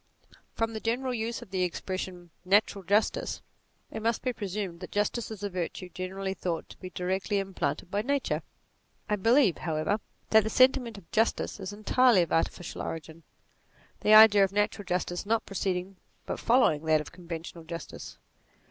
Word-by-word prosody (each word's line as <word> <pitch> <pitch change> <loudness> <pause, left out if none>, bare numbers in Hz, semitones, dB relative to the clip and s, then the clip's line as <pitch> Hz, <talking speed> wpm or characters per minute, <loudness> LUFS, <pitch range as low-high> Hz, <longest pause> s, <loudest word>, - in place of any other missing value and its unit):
From 225 0 -1
the 220 - -4
general 250 +4 -1
use 235 +1 -3
of 205 - -17
the 190 -1 -1
expression 180 -1 -4
" - - -42 0.2
natural 200 -2 -9
justice," 205 +4 0 0.5
it - - -5
must 230 +1 0
be 255 -1 0
presumed 195 -5 -4
that 180 - -8
justice 210 +3 -1
is 210 -2 -8
a 205 - -1
virtue 180 +1 -4
generally 190 +2 -4
thought 175 -3 -3
to - - -12
be 185 - -7
directly 190 +3 -1
implanted 185 -5 -2
by 205 - +1
nature. 280 +4 0 0.7
I 210 - +1
believe, 225 - +3
however, 160 +6 -1 0.3
that 220 -1 +7
the 220 - -2
sentiment 255 -2 +3
of 185 -4 -15
justice 225 -1 0
is 190 0 -5
entirely 215 0 +4
of 170 - -6
artificial 165 +1 -1
origin; 160 0 -6 0.8
the 215 - +5
idea 215 -2 +9
of 195 - +1
natural 205 0 0
justice 175 0 -2
not 225 +2 0
preceding 190 -1 -3 0.3
but - - -4
following 230 - +3
that 155 -1 +4
of 150 - -7
conventional 170 -1 -8
justice. 170 +1 -8
195 Hz, 170 wpm, -29 LUFS, 180-220 Hz, 0.8 s, idea